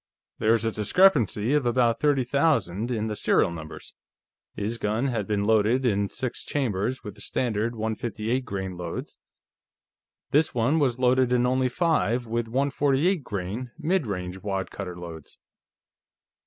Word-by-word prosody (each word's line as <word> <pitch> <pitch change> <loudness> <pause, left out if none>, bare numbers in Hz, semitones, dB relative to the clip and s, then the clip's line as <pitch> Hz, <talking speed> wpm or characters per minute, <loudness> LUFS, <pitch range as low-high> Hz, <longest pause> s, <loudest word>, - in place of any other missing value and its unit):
There 110 +1 +4
was 115 -1 +1
a 115 - +1
discrepancy 115 - +3
of 150 -2 +3
about 120 -1 +2
thirty 145 -3 +2
thousand 120 - +1
in 110 -3 -1
the 110 -1 -3
serial 90 - +2
numbers. 80 -2 -9 0.6
His 110 +3 -3
gun 110 +6 0
had 110 -5 -2
been 105 -2 0
loaded 110 +4 +3
in 100 -4 +1
six 130 -2 -4
chambers 125 -2 -2
with 105 -4 -7
the 105 - -13
standard 115 0 -1
158 110 +2 -2
grain 95 -5 -5
loads; 85 -2 -6 1.1
this 150 -1 +2
one 125 +7 +2
was 130 -5 +1
loaded 130 0 +3
in 125 0 +3
only 130 0 +2
five, 125 -5 +1
with 115 0 -2
148 140 +6 +1
grain 105 +4 -4
mid 170 -3 0
range 90 -1 -4
wad 95 -1 -3
cutter 90 -3 -6
loads. 85 -3 -9
115 Hz, 150 wpm, -26 LUFS, 105-130 Hz, 1.1 s, There